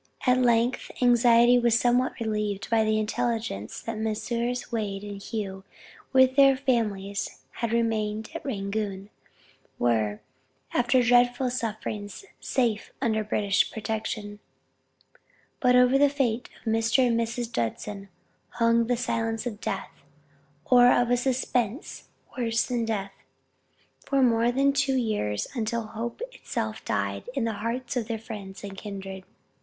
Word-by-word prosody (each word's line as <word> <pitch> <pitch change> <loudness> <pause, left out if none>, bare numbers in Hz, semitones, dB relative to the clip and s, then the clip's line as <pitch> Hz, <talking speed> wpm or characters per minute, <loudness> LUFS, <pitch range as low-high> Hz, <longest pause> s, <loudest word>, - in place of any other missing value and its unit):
At 250 0 +4
length 240 0 +2
anxiety 240 0 +5
was 235 -1 +3
somewhat 250 +2 +1
relieved 210 -2 -2
by 225 -1 +4
the 215 0 +1
intelligence 220 - -2
that 225 -1 -4
Messrs. 235 +3 -2
Wade 205 -4 -3
and 205 -1 -7
Hough 195 -3 -5 0.5
with 260 -1 +5
their 275 -1 +6
families, 210 -7 -1
who - - -17 0.2
had 235 -1 -1
remained 220 -2 -1
at - - -6
Rangoon, 200 -3 -3 0.7
were, 110 -3 +1 0.5
after 245 +1 +3
dreadful 245 +1 +3
sufferings, 215 - -4
safe 230 -5 -1
under 220 -4 +1
British 205 -1 +1
protection. 215 -1 -4 1.2
But 250 -1 +4
over 250 +2 +5
the 285 0 +5
fate 255 -4 -1
of 220 - -2
Mr. 225 +3 +3
and 230 -1 +2
Mrs. 235 +1 -2
Judson 195 - -3 0.4
hung 230 0 +3
the 245 0 +1
silence 225 -1 -2
of 225 -3 -5
death, - - -3 0.7
or 245 -1 +6
of 245 0 +2
a - - +5
suspense 250 - -1 0.3
worse 230 -3 +1
than 240 -2 -1
death, 200 -3 -3 0.9
for 275 -2 +3
more 235 -1 +3
than 275 +2 +2
two 275 -1 +1
years, 105 - -1
until 230 -1 -1
hope 230 - -6
itself 110 - -4
died 100 - -2
in 270 - 0
the 225 -1 0
hearts 245 +3 -3
of 235 -3 -1
their 230 -1 -2
friends 210 -4 -9
and 200 -1 -7
kindred. 195 -2 -7
230 Hz, 140 wpm, -26 LUFS, 210-245 Hz, 1.2 s, their